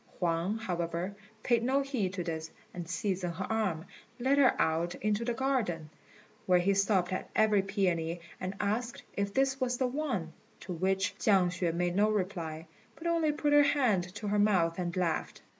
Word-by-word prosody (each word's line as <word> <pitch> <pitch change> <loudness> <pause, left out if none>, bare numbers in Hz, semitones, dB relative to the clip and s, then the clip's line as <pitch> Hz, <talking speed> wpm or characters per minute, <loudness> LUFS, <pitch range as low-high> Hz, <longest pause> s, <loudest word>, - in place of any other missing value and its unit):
Huang, 175 +4 0
however, 175 -2 -3 0.3
paid 235 -2 +3
no 265 +4 +2
heed 250 -9 -1
to 185 -1 -3
this, 160 -1 -4 0.2
and 175 -2 -6
seizing 185 -1 -1
her 185 +3 -4
arm, 195 -7 0 0.3
led 270 +3 +3
her 265 -3 +4
out 165 +2 +1
into 215 +2 0
the 235 0 -1
garden, 215 - -1 0.6
where 180 -1 +5
he 185 +3 +2
stopped 195 -2 +2
at 185 - -4
every 215 -2 +4
peony 180 -4 -1 0.2
and 185 +2 -4
asked 225 +4 -2
if 200 0 -1
this 270 +3 +1
was 250 -1 0
the 260 - +1
one; 245 - -2 0.3
to 185 - -5
which 190 +3 0
Chiang 190 -4 +4
hsüeh 180 -1 -1
made 175 0 0
no 210 +2 +4
reply, 175 -6 -2 0.3
but 325 - -12
only 335 -2 +2
put 295 0 0
her 290 - +8
hand 250 -11 +3
to 210 - -5
her 205 0 +2
mouth 185 -5 +3
and 175 0 -2
laughed. 170 -3 -1
195 Hz, 180 wpm, -31 LUFS, 175-235 Hz, 0.6 s, her